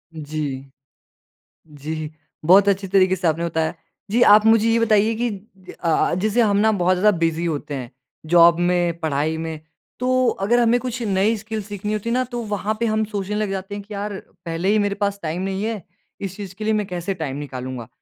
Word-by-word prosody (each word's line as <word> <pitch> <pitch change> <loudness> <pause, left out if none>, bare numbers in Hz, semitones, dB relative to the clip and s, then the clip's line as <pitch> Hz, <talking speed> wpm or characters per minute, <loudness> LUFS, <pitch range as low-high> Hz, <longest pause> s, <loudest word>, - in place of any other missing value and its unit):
जी। 145 -3 -5 1.1
जी, 155 +1 -4 0.4
बहुत 195 +4 +6
अच्छे 195 0 0
तरीके 190 -1 +3
से 180 -1 -1
आपने 165 +1 0
बताया। 160 -1 -1 0.4
जी, 240 - +2
आप 210 -2 +7
मुझे 225 0 +5
ये 230 0 +3
बताइए 220 -1 +3
कि 240 +2 -1 0.5
अ 170 - -3
अ, 160 - +2
जैसे 215 +5 +1
हम 205 -3 +3
ना 220 +2 +4
बहुत 185 -2 +2
ज़्यादा 210 +3 +4
बिज़ी 165 0 0
होते 150 -3 -3
हैं, 125 -3 -5 0.3
जॉब 170 +1 +6
में, 175 -1 +1
पढ़ाई 155 0 -1
में 160 -1 -5 0.4
तो 255 0 +2
अगर 220 +5 +1
हमें 240 +1 +3
कुछ 250 0 -4
नई 205 +1 +2
स्किल्स 220 0 -5
सीखनी 205 +1 -4
होती 215 +2 -3
है - - 0
ना 255 +1 +2
तो 240 - -3
वहाँ 210 0 -2
पे 235 - +1
हम 220 -1 +1
सोचने 205 -1 -4
लग 210 -1 -1
जाते 195 +1 -4
हैं 205 - -6
कि 210 +1 -11
यार, 205 +1 -4 0.3
पहले 165 +3 -1
ही 215 +1 +3
मेरे 205 -1 0
पास 200 0 -1
टाइम 165 +3 -2
नहीं 195 +1 -2
है, 220 -4 -3 0.4
इस 195 -2 -4
चीज़ 190 -3 -8
के 215 - -7
लिए 220 0 +1
मैं 210 -1 0
कैसे 180 +2 -3
टाइम 150 -6 -4
निकालूँगा। 130 -4 -6
195 Hz, 210 wpm, -21 LUFS, 165-215 Hz, 1.1 s, आप